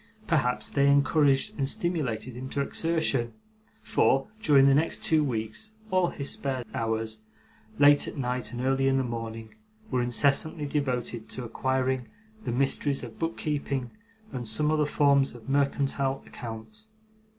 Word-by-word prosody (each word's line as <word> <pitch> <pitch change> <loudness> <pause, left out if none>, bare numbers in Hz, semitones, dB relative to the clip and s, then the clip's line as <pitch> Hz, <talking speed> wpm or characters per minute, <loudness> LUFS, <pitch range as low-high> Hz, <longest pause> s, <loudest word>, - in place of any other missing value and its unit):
Perhaps 145 - 0
they 140 -1 +3
encouraged 140 -1 +3
and 135 - +1
stimulated 130 -10 -1
him 130 +1 -6
to 140 - -1
exertion, 140 -6 0 0.5
for, 135 +5 +2
during 140 -8 +5
the 140 - +6
next 155 +4 +1
two 155 -1 +3
weeks, 110 - -3 0.2
all 185 -1 +3
his 140 -4 0
spare 130 -3 -1
hours, 110 -1 -2 0.6
late 145 0 +6
at - - -7
night 125 -3 -2
and 120 - -5
early 135 +1 +1
in 135 0 +3
the 135 - +1
morning, 115 -2 -6 0.4
were 125 -1 +1
incessantly 140 +5 +1
devoted 125 -6 -2
to 125 - -4
acquiring 130 +1 -1 0.4
the - - -1
mysteries 135 +2 0
of 115 -2 -9
book 165 0 -2
keeping 140 -4 -2 0.4
and 125 -3 -4
some 150 +8 +1
other 155 -1 +2
forms 140 -3 +3
of 120 - -13
mercantile 140 -1 0
account. 120 - -9
135 Hz, 150 wpm, -27 LUFS, 120-145 Hz, 0.6 s, the